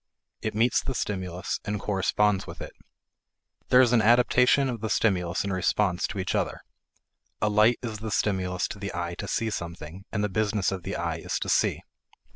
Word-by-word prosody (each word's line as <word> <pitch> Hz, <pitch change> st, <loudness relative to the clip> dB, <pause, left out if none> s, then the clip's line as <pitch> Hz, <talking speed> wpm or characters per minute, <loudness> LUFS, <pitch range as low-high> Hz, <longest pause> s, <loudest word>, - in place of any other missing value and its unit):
It 110 Hz, -1 st, -3 dB
meets 115 Hz, +2 st, +3 dB
the 135 Hz, -, -4 dB
stimulus, 95 Hz, -5 st, -3 dB
and 105 Hz, -1 st, -3 dB
corresponds 100 Hz, 0 st, +1 dB
with -, -, -9 dB
it. -, -, -7 dB, 1.0 s
There 125 Hz, -, +7 dB
is 125 Hz, -2 st, +3 dB
an 115 Hz, -, +5 dB
adaptation 125 Hz, +4 st, +4 dB
of 120 Hz, -4 st, -4 dB
the 110 Hz, -, -2 dB
stimulus 90 Hz, -5 st, +1 dB
and 100 Hz, -1 st, -2 dB
response 95 Hz, 0 st, +1 dB
to 100 Hz, -, -7 dB
each 95 Hz, -, -2 dB
other. -, -, -1 dB, 0.8 s
A 105 Hz, -, +1 dB
light 105 Hz, +3 st, +4 dB
is 110 Hz, -3 st, -4 dB
the 110 Hz, +1 st, -5 dB
stimulus 95 Hz, -3 st, 0 dB
to 100 Hz, -, -7 dB
the 100 Hz, -3 st, -5 dB
eye 85 Hz, 0 st, -3 dB
to -, -, -4 dB
see 115 Hz, -1 st, -1 dB
something, 85 Hz, 0 st, -7 dB
and 105 Hz, -, -1 dB
the -, -, +2 dB
business 105 Hz, -2 st, 0 dB
of 95 Hz, -2 st, -4 dB
the -, -, -5 dB
eye -, -, -2 dB
is -, -, -3 dB
to -, -, -4 dB
see. -, -, +2 dB
105 Hz, 195 wpm, -27 LUFS, 95-110 Hz, 1.0 s, There